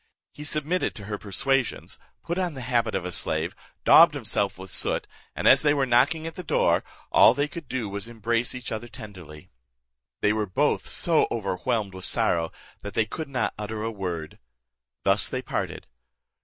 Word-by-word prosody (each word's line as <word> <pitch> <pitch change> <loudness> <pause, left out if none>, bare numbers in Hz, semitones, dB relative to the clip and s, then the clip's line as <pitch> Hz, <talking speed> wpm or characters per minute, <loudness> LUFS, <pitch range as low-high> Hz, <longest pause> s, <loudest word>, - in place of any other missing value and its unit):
He 150 - -9
submitted 155 +4 0
to 105 - -9
her 105 -1 -4
persuasions, 135 +6 -1 0.2
put 170 +2 -2
on 180 -4 -1
the 130 - -6
habit 120 -3 0
of 95 -2 -2
a 90 - -3
slave, - - -2 0.3
daubed 160 -2 +8
himself 105 -7 -1
with 95 +1 -8
soot, - - 0 0.3
and - - 0
as - - +8
they 150 -1 +3
were 140 -2 +2
knocking 130 +6 +3
at 165 - -5
the 180 - -7
door, 160 - +2 0.3
all 115 - +7
they 145 +1 +1
could 165 -2 -9
do 125 -4 -2
was 100 +1 -4
to - - -8
embrace 115 +2 -1
each 125 -1 -6
other 110 +1 -4
tenderly. 90 -10 -11 0.7
They 105 - +3
were 105 -1 -1
both 145 +11 +1
so 165 -2 +2
overwhelmed 100 -1 -1
with 95 0 -5
sorrow, 85 -1 +1 0.3
that 100 -1 -7
they 115 - +3
could 155 +7 -6
not 125 -4 -1
utter 105 +1 -4
a 115 - -2
word. 90 -7 -5 0.6
Thus - - +2
they - - -3
parted. - - -3
115 Hz, 185 wpm, -26 LUFS, 100-145 Hz, 0.7 s, daubed